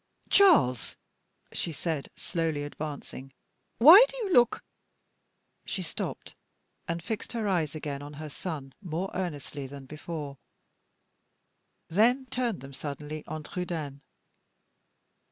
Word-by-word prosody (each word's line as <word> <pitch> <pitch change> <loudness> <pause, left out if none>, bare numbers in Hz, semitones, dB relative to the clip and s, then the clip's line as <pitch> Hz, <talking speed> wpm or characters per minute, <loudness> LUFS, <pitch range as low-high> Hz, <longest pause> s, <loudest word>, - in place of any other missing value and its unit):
"Charles," 290 - +5 0.6
she 170 - -2
said, 155 -1 -3
slowly 160 -4 -2
advancing; 145 -2 -7 0.4
"why 330 - +11
do - - -8
you 415 -7 -1
look 240 -4 +4 0.5
" - - -47
She - - -2
stopped, - - -5 0.5
and 170 -2 -2
fixed 220 +3 -4
her 225 -3 -1
eyes 165 -6 0
again 145 -2 -4
on 145 +1 -8
her 155 +1 -7
son 145 -7 -6
more 180 +1 -3
earnestly 145 -6 -4
than 140 0 -9
before; 150 -1 -6 1.5
then 240 +9 +3
turned 240 -6 -1
them 140 0 -10
suddenly 150 +2 -6
on 155 0 -5
Trudaine. 155 -5 -4
155 Hz, 120 wpm, -29 LUFS, 145-190 Hz, 1.5 s, why